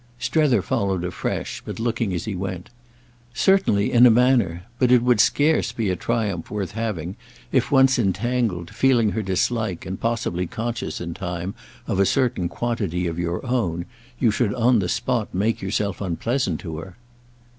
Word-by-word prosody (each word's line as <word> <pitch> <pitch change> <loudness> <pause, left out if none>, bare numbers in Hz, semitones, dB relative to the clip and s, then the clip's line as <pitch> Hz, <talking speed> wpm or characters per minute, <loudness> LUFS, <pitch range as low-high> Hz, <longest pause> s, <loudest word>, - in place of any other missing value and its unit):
Strether 130 - +2
followed 95 -3 -1
afresh, 90 0 -3
but - - -7
looking 115 -2 -1
as 90 - -3
he 110 - -3
went. 95 +1 -5 0.6
"Certainly—in 125 - +4
a - - +7
manner. 115 -8 +3 0.2
But 125 -1 +3
it 125 -2 +5
would 125 -3 +3
scarce 155 +2 +2
be 110 -5 -1
a - - 0
triumph 105 -3 -2
worth 100 -3 -3
having 105 -6 -4 0.3
if, - - +1
once 135 -2 +5
entangled, 100 -3 -1
feeling 120 -5 +3
her 110 - -1
dislike 100 0 -1
and 95 +1 -6
possibly 115 -6 -1
conscious 115 +5 -4
in 85 -1 -4
time 90 +1 -4 0.3
of - - -1
a 100 - +4
certain 125 -10 +1
quantity 100 -7 -2
of 85 0 -3
your 85 +5 -2
own, 95 -10 -1 0.3
you 120 -3 +3
should 105 +1 0
on 120 -1 +3
the 90 -3 -1
spot 120 0 -1
make 105 +4 0
yourself 100 0 -2
unpleasant 100 - -1
to 80 -4 -6
her." 90 +3 -10
105 Hz, 165 wpm, -23 LUFS, 90-120 Hz, 0.6 s, a